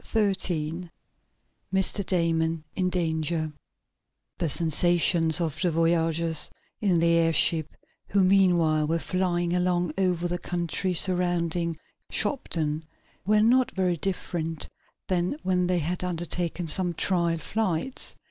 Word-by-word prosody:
Chapter 210 -3 +1
13 170 -2 -3 0.8
Mr. 190 +1 +2
Damon 165 -3 0
In 185 -1 +1
Danger 160 -2 -1 0.9
The 170 -3 0
sensations 165 +1 +3
of 165 -4 -2
the 180 - +2
voyagers 165 -1 +1 0.3
in 190 -5 +2
the 170 0 +3
airship, 165 -1 +3 0.3
who 195 -1 +2
meanwhile, 175 -5 +3
were 165 +2 +1
flying 175 0 -1
along 180 -2 0
over 180 -2 +1
the 175 0 -3
country 175 +2 -2
surrounding 175 -2 0 0.3
Shopton, 160 - -1 0.4
were 210 0 +4
not 250 +3 +4
very 185 -2 +1
different 165 -3 -3 0.4
than 180 +7 0
when 180 -1 +1
they 180 0 +1
had 175 +3 -2
undertaken 175 0 -2
some 175 +1 +1
trial 170 -2 +1
flights. 200 - -2
175 Hz, 120 wpm, -26 LUFS, 165-185 Hz, 0.9 s, were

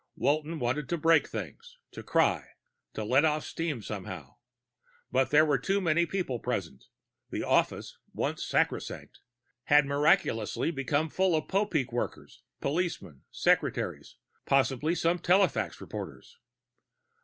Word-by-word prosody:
Walton 155 +3 0
wanted 130 +2 -2
to 170 - 0
break 165 +1 +4
things, - - -8
to - - -8
cry, - - +1 0.4
to 110 - -3
let 130 +7 +3
off 155 -1 +1
steam 155 -9 -3
somehow. 95 -10 -7 0.7
But 130 0 +2
there 150 +2 +5
were 145 -4 +2
too 195 +10 0
many 170 -2 +2
people 175 -11 -2
present; 85 - -4 0.4
the - - -3
office, - - 0
once - - -2
sacrosanct, - - -2 0.5
had 145 0 +5
miraculously 145 - +1
become 145 +1 0
full 185 -2 +2
of 155 - -1
Popeek 170 - 0
workers, 120 - -5 0.2
policemen, 150 - -3
secretaries, - - 0 0.3
possibly 140 +4 +2
some 170 +1 +1
telefax 190 +4 +2
reporters. 475 - -8
150 Hz, 125 wpm, -29 LUFS, 125-170 Hz, 0.7 s, there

